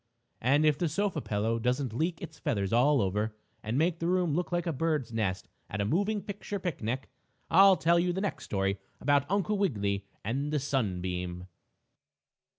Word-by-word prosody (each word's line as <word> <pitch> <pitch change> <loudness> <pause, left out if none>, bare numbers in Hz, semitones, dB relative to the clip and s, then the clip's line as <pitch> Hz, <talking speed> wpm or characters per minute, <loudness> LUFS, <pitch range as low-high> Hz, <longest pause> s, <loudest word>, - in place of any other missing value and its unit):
And 140 +6 +3
if 150 -2 +3
the 175 - +1
sofa 195 -1 -1
pillow 110 +1 -1
doesn't 125 +1 0
leak 165 +7 -1
its - - -9
feathers 105 - -1
all 130 +1 +4
over, 105 +3 -1 0.3
and 110 +4 -2
make 165 +2 +1
the 165 - -1
room 180 -3 +2
look 175 +4 -1
like 175 0 0
a 165 - -1
bird's 150 -4 -1
nest 100 -4 -1 0.2
at 105 - -4
a 100 - +1
moving 200 - 0
picture 205 0 -5
picnic, 135 - -3 0.4
I'll 195 +2 +8
tell 170 +1 +3
you 180 +1 +1
in 175 - -1
the 190 - -1
next 205 - -3
story 100 0 -1 0.2
about 145 -1 +2
Uncle 205 +1 +1
Wiggily 100 - 0 0.2
and 135 +7 -2
the 150 - +1
sunbeam. 90 -10 -2
140 Hz, 180 wpm, -30 LUFS, 105-175 Hz, 0.4 s, I'll